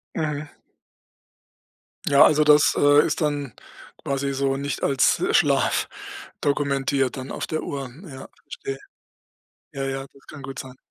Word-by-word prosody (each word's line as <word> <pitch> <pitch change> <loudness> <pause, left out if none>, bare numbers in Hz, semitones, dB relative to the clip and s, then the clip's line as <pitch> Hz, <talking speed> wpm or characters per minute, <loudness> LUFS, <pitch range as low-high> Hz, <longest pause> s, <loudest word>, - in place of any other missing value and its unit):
Mhm. 150 -2 -3 1.6
Ja, 140 -1 +7
also 150 0 +4
das, 150 0 +5
äh, 145 +1 +5
ist - - -2
dann 145 -5 -1 0.5
quasi 140 0 -2
so 135 0 0
nicht 140 +1 -4
als 135 -1 +2
Schlaf - - +2 0.5
dokumentiert 140 -2 0
dann 130 0 -7
auf - - -4
der 155 - -3
Uhr. 135 -3 -5 0.2
Ja, 135 -3 -10
verstehe. 135 0 -7 1.0
Ja, 135 0 -4
ja, 135 0 -3
das 140 - -22
kann 145 - -10
gut 135 0 -8
sein. 130 -1 -8
140 Hz, 140 wpm, -23 LUFS, 135-145 Hz, 1.6 s, Ja